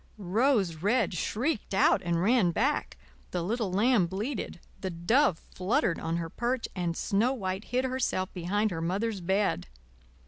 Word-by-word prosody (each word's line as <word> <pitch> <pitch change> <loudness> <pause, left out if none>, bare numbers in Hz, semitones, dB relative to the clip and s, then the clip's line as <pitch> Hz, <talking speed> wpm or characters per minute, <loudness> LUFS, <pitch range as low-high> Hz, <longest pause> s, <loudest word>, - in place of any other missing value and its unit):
Rose 205 - +1
Red 205 +7 +1
shrieked 220 - -1
out 195 - +4
and 170 -1 0
ran 225 -3 +4
back, 265 - 0 0.3
the 175 -2 -2
little 215 +1 -1
lamb 210 -1 +3
bleated, 200 +1 -4 0.2
the 190 - -3
dove 185 - +2 0.2
fluttered 190 - +1
on 165 +1 -2
her 170 -1 -3
perch, 240 +1 -1
and 175 -3 -2
Snow 225 +6 +1
White 190 -4 -3
hid 255 +2 0
herself 250 -8 -1
behind 200 +4 0
her 165 -2 -3
Mother's 195 +4 -1
bed. 190 - 0
200 Hz, 150 wpm, -29 LUFS, 175-240 Hz, 0.3 s, out